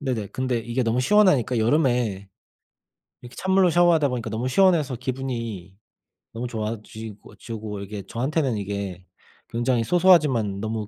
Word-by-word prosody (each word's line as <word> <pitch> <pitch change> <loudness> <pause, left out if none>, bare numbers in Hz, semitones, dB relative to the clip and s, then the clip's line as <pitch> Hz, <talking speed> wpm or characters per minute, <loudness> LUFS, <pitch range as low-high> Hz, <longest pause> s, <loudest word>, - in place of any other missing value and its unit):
네네. 125 -8 -3
근데 130 -2 -2
이게 120 +3 -2
너무 115 +2 0
시원하니까 145 - +3
여름에 120 -6 +1 0.9
이렇게 120 +1 -12
찬물로 190 -1 +3
샤워하다 170 -4 +4
보니까 120 -3 -4
너무 110 +4 -3
시원해서 155 -3 +3
기분이 115 -7 -5 0.6
너무 120 +2 -4
좋아지고 110 -2 -7
지고 105 -1 -7
이게 100 0 -7
저한테는 130 0 -1
이게 100 -2 -5 0.4
굉장히 120 0 0
소소하지만 145 - +3
너무 110 -1 -3
120 Hz, 355 characters per minute, -24 LUFS, 110-135 Hz, 0.9 s, 샤워하다